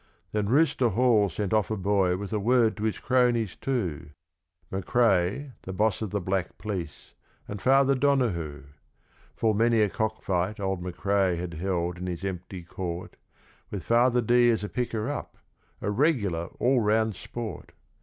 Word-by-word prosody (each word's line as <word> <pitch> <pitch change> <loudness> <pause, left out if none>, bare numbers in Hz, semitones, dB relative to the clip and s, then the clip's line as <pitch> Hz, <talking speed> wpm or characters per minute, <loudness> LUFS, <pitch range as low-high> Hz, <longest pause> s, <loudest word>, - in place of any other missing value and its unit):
Then 105 -1 -1
Rooster 135 -2 +3
Hall 110 -2 +3
sent 100 +4 -3
off 110 -1 +2
a 110 - -1
boy 95 -2 +2
with 100 +2 -6
word 115 +1 +2
to 105 - -5
his 110 - -1
cronies 120 -5 +1
two, 95 - -3 0.6
McCrae 100 - +1
(the 95 - -7
boss 105 +2 +1
of 110 - -2
the 105 - -1
Black 95 -1 -2
Police) 90 -8 -6 0.3
and 100 -1 -6
Father 135 +1 +4
Donahoo. 120 - 0 0.7
Full 110 -1 +1
many 115 +2 +3
a 105 - +3
cockfight 105 -2 -1
old 95 -2 -2
McCrae 95 0 0
had 85 0 -5
held 85 0 -2
in 90 - -4
his 90 0 -5
empty 90 -1 -5
Court, 85 0 -6 0.5
With 100 -4 -5
Father 120 +1 +3
D. 120 +1 +4
as 110 -3 +1
a 105 - -4
picker 115 -3 -2
up 145 - -5 0.4
a 105 - -1
regular 105 - +1
all 125 +1 +3
round 110 -1 +1
Sport! 115 +4 -7
105 Hz, 155 wpm, -27 LUFS, 90-120 Hz, 0.7 s, Father